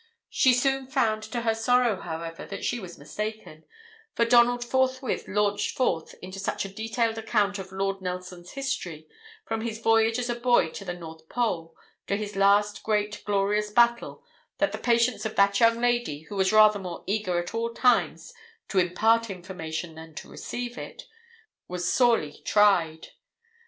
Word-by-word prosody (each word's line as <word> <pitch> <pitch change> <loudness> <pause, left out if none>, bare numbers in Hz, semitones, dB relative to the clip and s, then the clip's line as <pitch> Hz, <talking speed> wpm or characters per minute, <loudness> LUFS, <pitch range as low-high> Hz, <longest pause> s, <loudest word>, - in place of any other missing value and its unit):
She 255 -2 +4
soon 270 +1 0
found 220 -4 +1
to 235 +2 -4
her 225 -1 +1
sorrow, 235 -1 +2
however, 165 0 -6
that 200 - -6
she 240 - -1
was 180 -5 -9
mistaken: 210 0 -6 0.5
for 235 - +3
Donald 240 +1 +4
forthwith 260 0 0
launched 205 0 0
forth 165 -11 0
into 185 +1 -7
such 195 - -2
a - - -6
detailed 225 +1 -1
account 210 -3 0
of 190 -1 -8
Lord 195 0 -2
Nelson's 180 -1 -6
history, 180 - -4 0.4
from 225 0 -3
his 225 -1 -4
voyage 225 0 +3
as 245 -1 -2
a 240 - 0
boy 240 -7 +2
to - - -8
the 175 -2 -5
North 160 -2 -11
Pole, 175 -9 -2 0.3
to 200 - 0
his 210 0 -5
last 205 +1 +3
great, 210 -1 -1
glorious 205 +1 +1
battle, 235 +2 +2 0.3
that - - +1
the - - -5
patience 235 0 +2
of 220 - -4
that 200 0 +4
young 230 0 +4
lady, 240 -11 0
who 160 +6 -10
was 190 0 +2
rather 215 -1 +6
more 180 -3 -7
eager 195 -4 -1
at 175 0 -3
all 230 +1 -1
times 250 - +1 0.4
to 195 - +2
impart 220 +6 +2
information 175 -3 -6
than 160 0 -12
to - - -8
receive 245 0 -6
it, - - -9 0.6
was 180 0 -2
sorely 230 - +2
tried. 175 -7 +2
210 Hz, 165 wpm, -26 LUFS, 180-235 Hz, 0.6 s, rather